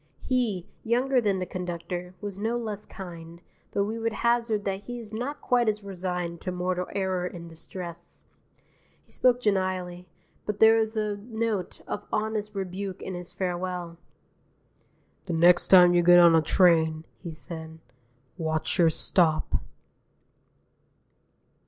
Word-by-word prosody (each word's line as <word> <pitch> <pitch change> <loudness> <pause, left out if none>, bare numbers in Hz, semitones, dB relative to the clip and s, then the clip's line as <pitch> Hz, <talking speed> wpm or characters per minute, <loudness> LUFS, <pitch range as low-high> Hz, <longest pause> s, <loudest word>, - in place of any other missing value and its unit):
He, 230 -9 0 0.2
younger 250 +3 +2
than 200 -4 +1
the 185 - -2
conductor, 180 0 -5
was 200 -2 -6
no 225 +3 0
less 215 -3 -5
kind, 170 -3 -9 0.3
but 200 - +1
we 220 +3 -3
would 225 0 -1
hazard 235 -3 +1
that 195 0 -3
he 245 0 -5
is 225 -2 -9
not 250 +7 -4
quite 245 -2 +3
as 210 -1 -2
resigned 180 -3 -4
to 185 - -3
mortal 180 0 -2
error 190 -2 0
and 170 -2 -8
distress. 170 +1 -9 0.8
He - - -25
spoke 250 -1 +3
genially, 185 -4 -1 0.4
but 210 -1 -3
there 220 0 +7
was 220 0 0
a 210 -1 -1
note 220 -2 -3
of - - -5
honest 215 -1 -2
rebuke 190 0 -4
in 190 - -5
his 175 -1 -5
farewell. 180 -1 -3 1.3
"The 175 - -2
next 175 +2 +5
time 180 -2 +8
you 175 - +5
get 175 +1 +7
on 170 -1 +8
a 160 - +5
train," 160 -2 +3 0.2
he 175 - -6
said, 160 0 -8 0.6
"watch 160 +2 -1
your 170 -2 +6
stop." 160 0 +1
185 Hz, 145 wpm, -27 LUFS, 175-215 Hz, 1.3 s, time